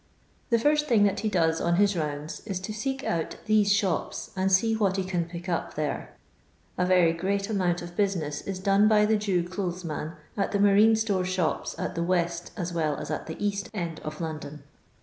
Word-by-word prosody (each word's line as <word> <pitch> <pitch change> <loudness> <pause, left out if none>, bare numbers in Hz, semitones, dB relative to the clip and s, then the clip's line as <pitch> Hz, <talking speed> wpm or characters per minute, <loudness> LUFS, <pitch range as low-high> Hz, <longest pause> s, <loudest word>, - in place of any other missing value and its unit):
The 235 - +4
first 300 +5 +2
thing 220 -4 +4
that 200 -1 +2
he 215 - 0
does 165 -4 +1
on 170 0 +2
his 200 +1 +3
rounds 150 -1 -4
is 195 -3 -2
to 215 +3 -5
seek 265 +5 -3
out 165 -1 -2
these 210 -2 +3
shops, 195 -5 0
and 190 0 +1
see 225 +4 +4
what 200 -3 +1
he 190 - 0
can 180 -2 -1
pick 170 +1 -8
up 170 -2 -2
there. 150 -1 -3 0.6
A 180 - +1
very 180 -3 +4
great 195 +4 -1
amount 175 -4 0
of 175 0 -9
business 170 -8 -1
is 195 -1 -3
done 195 +2 +3
by 210 -1 +5
the 220 +1 +3
Jew 190 -5 0
clothes 180 -1 -4
man 155 0 -4 0.2
at 200 - -1
the 200 - +1
marine 205 +2 +6
store 210 -4 0
shops 180 -2 -1
at - - -3
the 170 - -2
west 170 -1 0
as 175 -2 -3
well 155 -3 0
as - - -5
at - - -4
the 160 - -6
east 200 -1 -2
end 170 -4 -3
of 155 0 -7
London. 155 -3 -6
185 Hz, 210 wpm, -27 LUFS, 170-205 Hz, 0.6 s, marine